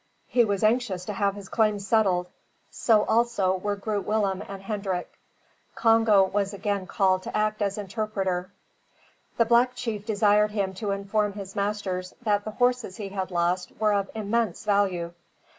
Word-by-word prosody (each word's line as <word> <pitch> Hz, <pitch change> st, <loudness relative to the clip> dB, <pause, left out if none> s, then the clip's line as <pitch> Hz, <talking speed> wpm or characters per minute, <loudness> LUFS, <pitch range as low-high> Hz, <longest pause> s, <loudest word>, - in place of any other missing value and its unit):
He 245 Hz, -, +3 dB
was 200 Hz, -1 st, -1 dB
anxious 215 Hz, -5 st, +1 dB
to 210 Hz, -, -4 dB
have 200 Hz, 0 st, 0 dB
his 200 Hz, -2 st, -9 dB
claim 215 Hz, -1 st, +2 dB
settled; 195 Hz, -3 st, +1 dB, 0.4 s
so 215 Hz, -3 st, +3 dB
also 225 Hz, -5 st, +2 dB
were 205 Hz, +2 st, -2 dB
Groot 205 Hz, 0 st, -3 dB
Willem 205 Hz, -3 st, 0 dB
and 195 Hz, -1 st, -7 dB
Hendrik. 195 Hz, -3 st, -3 dB, 0.6 s
Congo 225 Hz, -3 st, +5 dB
was 200 Hz, +1 st, -1 dB
again 200 Hz, -1 st, -2 dB
called 190 Hz, -2 st, +2 dB
to 185 Hz, -, -4 dB
act 215 Hz, 0 st, 0 dB
as 200 Hz, 0 st, 0 dB
interpreter. 195 Hz, -3 st, -2 dB, 0.9 s
The 230 Hz, -, +4 dB
black 240 Hz, +2 st, +3 dB
chief 225 Hz, -4 st, -4 dB
desired 210 Hz, -1 st, +3 dB
him 200 Hz, -3 st, -2 dB
to 210 Hz, -, -2 dB
inform 200 Hz, +1 st, 0 dB
his 195 Hz, -1 st, -8 dB
masters, 200 Hz, -3 st, -2 dB
that 205 Hz, -2 st, +1 dB
the -, -, -3 dB
horses 245 Hz, -3 st, 0 dB
he 205 Hz, -2 st, -5 dB
had 190 Hz, -1 st, -3 dB
lost 180 Hz, +1 st, 0 dB
were 215 Hz, -1 st, +3 dB
of 200 Hz, -1 st, 0 dB
immense 220 Hz, -2 st, -1 dB
value. 190 Hz, -5 st, +1 dB
205 Hz, 160 wpm, -26 LUFS, 190-215 Hz, 0.9 s, Congo